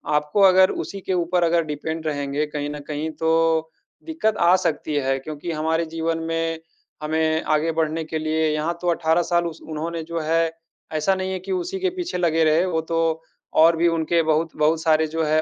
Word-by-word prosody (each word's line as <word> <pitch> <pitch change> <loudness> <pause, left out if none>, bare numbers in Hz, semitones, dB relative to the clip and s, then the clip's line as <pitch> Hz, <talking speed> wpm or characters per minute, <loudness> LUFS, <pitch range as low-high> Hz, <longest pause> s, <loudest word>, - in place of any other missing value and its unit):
आपको 150 +7 +1
अगर 185 0 +6
उसी 200 - -5
के 185 - -2
ऊपर 175 0 +1
अगर 170 0 +3
डिपेंड 160 +2 -4
रहेंगे 145 0 -1
कहीं 145 -1 -4
न 150 0 -6
कहीं, 155 +1 -3
तो 160 0 +1 0.3
दिक्कत 265 -10 -1
आ 175 +1 +5
सकती 155 -4 -1
है। 135 -1 +1
क्योंकि 155 +4 -6
हमारे 160 +1 0
जीवन 165 0 -2
में 165 0 -1 0.4
हमें 160 +1 +1
आगे 160 +2 +1
बढ़ने 160 +1 0
के 160 0 -4
लिए 155 0 0
यहाँ 160 +3 -2
तो 175 - -3
18 165 0 +2
साल 170 0 +3
उस 165 -1 -9
उन्होंने, 160 +1 -5
जो 170 +1 -4
है, 165 +1 +1 0.4
ऐसा 155 +5 +1
नहीं 190 0 -3
है 185 - -3
कि 190 +2 -7
उसी 185 - -2
के 375 - +1
पीछे 350 - -3
लगे 165 -2 +2
रहे। 160 +3 +3
वो 165 -3 0
तो 165 +1 -2 0.5
और 165 +1 +6
भी, 170 +1 +3
उनके 165 0 +1
बहुत 160 +1 0
बहुत 155 +1 +2
सारे, 160 -1 +3
जो 160 +1 -2
है, 155 +1 +2
160 Hz, 200 wpm, -22 LUFS, 155-170 Hz, 0.5 s, अगर